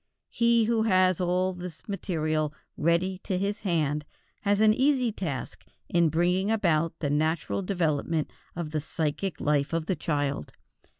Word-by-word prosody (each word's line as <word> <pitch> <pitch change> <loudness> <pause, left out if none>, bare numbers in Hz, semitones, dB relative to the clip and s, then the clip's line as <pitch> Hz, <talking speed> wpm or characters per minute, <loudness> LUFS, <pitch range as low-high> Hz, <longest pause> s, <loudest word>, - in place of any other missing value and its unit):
He 235 -1 +3
who 225 0 +2
has 185 -4 +3
all 180 +1 +1
this 180 -3 -9
material 155 -6 -1 0.2
ready 170 +4 +1
to 190 -1 -2
his 200 +2 -1
hand 150 -6 0 0.4
has 205 0 +2
an 215 0 +6
easy 260 -1 +2
task 165 -10 -5 0.3
in 170 -2 +3
bringing 180 +5 +1
about 165 -7 +1
the 145 -3 -2
natural 155 +5 0
development 165 -4 0 0.2
of 165 -3 -4
the 155 -1 -1
psychic 160 +3 -2
life 145 +1 +1
of 165 -1 0
the 185 - 0
child. 145 - -2
175 Hz, 145 wpm, -27 LUFS, 155-195 Hz, 0.4 s, an